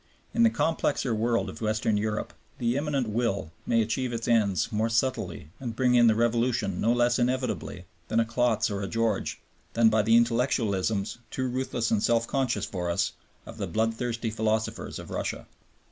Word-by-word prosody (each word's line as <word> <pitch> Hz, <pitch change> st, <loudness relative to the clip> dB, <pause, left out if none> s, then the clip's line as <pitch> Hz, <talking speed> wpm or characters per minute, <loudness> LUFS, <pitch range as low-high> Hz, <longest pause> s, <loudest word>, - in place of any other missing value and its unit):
In 235 Hz, -, +1 dB
the 230 Hz, -, +7 dB
complexer 150 Hz, -, 0 dB
world 115 Hz, +2 st, +1 dB
of -, -, -8 dB
Western 110 Hz, 0 st, +1 dB
Europe 105 Hz, +1 st, -2 dB, 0.2 s
the 120 Hz, 0 st, 0 dB
Immanent 140 Hz, -3 st, 0 dB
Will 105 Hz, -8 st, -1 dB, 0.2 s
may 115 Hz, -1 st, +3 dB
achieve 125 Hz, +3 st, -2 dB
its 115 Hz, -1 st, -4 dB
ends 105 Hz, -4 st, +2 dB
more 110 Hz, +1 st, 0 dB
subtly 115 Hz, -, -1 dB
and 120 Hz, -4 st, -5 dB
bring 125 Hz, 0 st, +2 dB
in 120 Hz, -1 st, +6 dB
the 110 Hz, -, +4 dB
revolution 115 Hz, -4 st, +1 dB
no 115 Hz, -, +3 dB
less 120 Hz, 0 st, +2 dB
inevitably 125 Hz, -7 st, -1 dB, 0.2 s
through 110 Hz, -, +2 dB
a -, -, +1 dB
Klotz 115 Hz, -2 st, +1 dB
or 100 Hz, 0 st, -2 dB
a 100 Hz, -, -3 dB
George 115 Hz, -2 st, -1 dB, 0.3 s
than 115 Hz, -1 st, +5 dB
by 110 Hz, 0 st, +3 dB
the 115 Hz, +2 st, +4 dB
intellectualisms, 115 Hz, -4 st, +1 dB
too 130 Hz, 0 st, -2 dB
ruthless 125 Hz, -2 st, -2 dB
and 110 Hz, -2 st, +2 dB
self 115 Hz, 0 st, +2 dB
conscious 130 Hz, -1 st, 0 dB
for 90 Hz, -2 st, -3 dB
us, 85 Hz, -, +1 dB, 0.3 s
of -, -, -10 dB
the -, -, -2 dB
bloodthirsty 115 Hz, +1 st, -1 dB
philosophers 110 Hz, 0 st, -1 dB
of -, -, -9 dB
Russia. -, -, -3 dB
115 Hz, 175 wpm, -27 LUFS, 110-120 Hz, 0.3 s, the